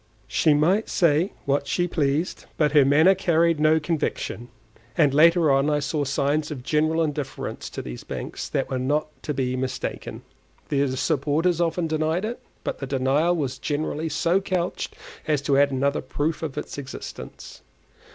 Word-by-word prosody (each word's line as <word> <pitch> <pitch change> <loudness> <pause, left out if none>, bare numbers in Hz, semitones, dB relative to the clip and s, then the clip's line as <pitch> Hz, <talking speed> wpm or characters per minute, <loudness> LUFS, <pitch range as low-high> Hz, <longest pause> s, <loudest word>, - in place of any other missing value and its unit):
She 155 -2 +3
might 180 +9 +2
say 170 +2 +2
what 140 0 0
she 175 0 +1
pleased, 155 0 -1
but 150 -2 +2
her 145 -2 +6
manner 155 +7 +5
carried 170 -3 +2
no 155 +1 +4
conviction, 150 -6 -3 0.5
and 145 -4 +4
later 165 +1 +5
on 135 +2 +3
I 150 - +2
saw 145 0 -1
signs 140 +3 0
of 140 -5 -6
general 155 +3 +1
indifference 145 -3 -4
to - - -6
these - - -7
banks - - -6
that - - -2
were 130 - -1
not 150 +4 0
to - - -3
be 130 -2 -1
mistaken. 130 0 -4 0.5
Their 140 -1 +2
supporters 145 +6 +1
often 170 0 0
denied 160 +4 0
it, 235 +2 -4 0.2
but - - -3
the 135 - -4
denial 140 +6 +2
was 135 -5 -3
generally 155 +1 -2
so 170 +5 +1
couched 185 -2 -2 0.3
as 150 -2 +2
to 140 -1 +3
add 145 0 +5
another 140 +2 0
proof 145 +4 -2
of 155 -4 -5
its - - -5
existence. 135 -2 -9
150 Hz, 165 wpm, -24 LUFS, 140-165 Hz, 0.5 s, her